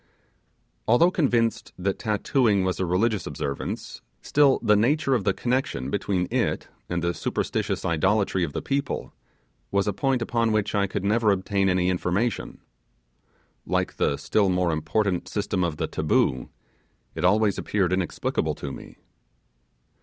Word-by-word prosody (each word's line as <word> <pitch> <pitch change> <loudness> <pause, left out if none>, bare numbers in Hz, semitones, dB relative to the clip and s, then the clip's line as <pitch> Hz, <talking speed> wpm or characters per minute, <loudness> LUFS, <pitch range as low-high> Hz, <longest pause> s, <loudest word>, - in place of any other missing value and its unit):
Although 165 +11 +5
convinced 120 -9 0
that 95 +1 -2
tattooing 105 -1 +1
was 95 -1 -1
a 95 - 0
religious 105 +4 +1
observance, 70 -1 -5 0.2
still 140 -2 +4
the 105 - +5
nature 135 +6 +2
of 115 -7 0
the 95 - +3
connection 120 - -1
between 95 -3 -1
it - - 0 0.2
and 85 -1 -2
the 85 0 +1
superstitious - - -2
idolatry 95 +3 +1
of 80 - -2
the - - -4
people 140 -1 -2 0.6
was 100 0 +1
a 105 - +1
point 130 +3 0
upon 115 -1 0
which 105 -1 0
I 100 -1 +2
could 95 - -4
never 110 +2 +2
obtain 100 0 +1
any 90 -1 +2
information. 95 +5 -1 1.0
Like - - -1
the 70 - +1
still 100 +7 +1
more 90 -1 +1
important 85 +5 -1
system 100 -3 -1
of 85 -3 -2
the - - -1
'Taboo', 65 - 0 0.6
it 80 - -5
always 105 +2 +3
appeared 95 -4 0
inexplicable 90 -3 -1
to 70 - -6
me. - - -11
100 Hz, 145 wpm, -25 LUFS, 90-115 Hz, 1.0 s, Although